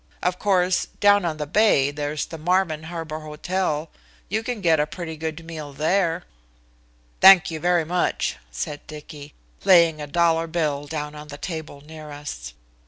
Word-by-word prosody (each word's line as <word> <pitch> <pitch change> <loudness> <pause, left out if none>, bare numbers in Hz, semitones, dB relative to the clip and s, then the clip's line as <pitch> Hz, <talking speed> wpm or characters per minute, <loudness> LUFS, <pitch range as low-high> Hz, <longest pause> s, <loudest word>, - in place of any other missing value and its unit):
Of 180 +1 0
course, 185 -2 +2
down 205 -2 +5
on 160 -2 -2
the 150 - -3
bay 145 -5 +3
there's 145 0 -3
the 165 - -9
Marvin 165 -2 +1
Harbor 165 -2 -5
Hotel. 155 +1 -2 0.4
You 215 +3 0
can 240 0 -4
get 165 -5 +3
a 150 - +1
pretty 165 0 -6
good 160 +1 -5
meal 155 -3 -7
there." 165 +3 +1 1.0
"Thank 190 -1 +8
you 160 - -4
very 175 0 +2
much," 175 +2 0
said 145 - -6
Dicky, 150 -1 -10 0.3
laying 170 -4 +5
a 150 - -5
dollar 165 +1 +2
bill 150 -3 -1
down 150 -1 -4
on 150 0 -10
the 145 -1 -9
table 160 -4 -6
near 155 0 -11
us. - - -7
160 Hz, 165 wpm, -23 LUFS, 150-175 Hz, 1.0 s, Thank